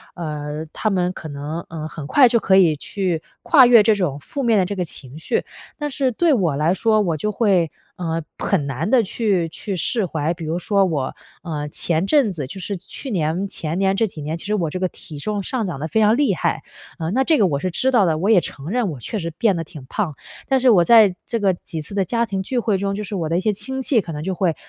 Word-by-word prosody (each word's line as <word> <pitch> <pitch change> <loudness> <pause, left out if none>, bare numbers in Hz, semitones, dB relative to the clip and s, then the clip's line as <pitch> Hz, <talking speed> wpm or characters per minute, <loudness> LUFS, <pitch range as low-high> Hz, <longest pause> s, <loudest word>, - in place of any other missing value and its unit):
呃， 150 -2 -5
他 215 - -1
们 180 -2 +1
可 160 - -8
能， 145 +3 -5
呃， 155 -1 -5
很 155 -3 -8
快 265 - +6
就 235 -1 +3
可 190 -3 +3
以 170 -5 +5
去 180 0 -2 0.2
跨 275 -6 +7
越 235 -3 +7
这 215 +1 +4
种 175 -8 -1
负 275 - -5
面 230 -2 +3
的 185 - +2
这 200 +3 -4
个 185 - -1
情 140 -2 -9
绪。 - - -1 0.3
但 295 -1 -3
是 270 -1 +1
对 330 +6 +3
我 175 - +1
来 155 +5 +2
说， 215 +1 +2
我 170 -6 0
就 210 - -2
会， 190 -6 +2 0.3
呃， 165 -2 -2 0.2
很 175 -8 0
难 145 +8 -2
地 245 -1 +4
去 190 -5 0
去 195 +4 -5
释 205 +4 +1
怀。 160 -1 -1
比 165 -1 -8
如 160 +2 -1
说 200 +2 +2
我， 145 -7 -2 0.3
嗯， 150 -4 -4
前 165 +4 -1
阵 275 -7 +3
子， 150 -6 -4
就 190 - -8
是 195 +2 -4
去 265 +9 -8
年、 170 +2 0
前 165 -3 -4
年 195 0 +2
这 225 +3 +2
几 160 -6 -9
年， 155 +3 -3
其 - - -9
实 210 - -1
我 170 -6 -1
这 185 - -4
个 185 - +1
体 150 -3 -10
重 205 +6 -2
上 240 +1 -2
涨 175 -7 -4
得 155 - -3
非 220 - 0
常 215 +1 +5
厉 285 +2 +2
害， - - -1 0.4
嗯， 160 +2 -2
那 265 - +3
这 315 +2 +3
个 200 - +5
我 145 - 0
是 185 +3 -2
知 260 +9 +2
道 235 -6 +4
的， 160 -3 +1
我 195 +5 0
也 220 -5 +7
承 140 0 -6
认 240 0 0
我 140 - -8
确 215 - -4
实 170 -2 -4
变 195 +5 +1
得 165 - -2
挺 150 -3 -11
胖。 190 -8 -2 0.3
但 265 -1 +3
是 255 - +4
我 185 -7 +6
在 220 -6 +6
这 230 - -2
个 195 -3 +2
几 165 -2 -7
次 175 +7 -8
的 195 - +1
家 235 +4 0
庭 195 -3 -3
聚 245 +5 -1
会 215 -4 +1
中， 195 +1 -2
就 210 - -4
是 205 0 -5
我 165 -4 -2
的 165 - 0
一 - - 0
些 215 +2 +2
亲 265 +6 -4
戚 255 -3 +2
可 170 - -8
能 150 -1 -5
就 190 0 -2
会， 170 -4 +1
185 Hz, 285 characters per minute, -21 LUFS, 160-215 Hz, 0.4 s, 跨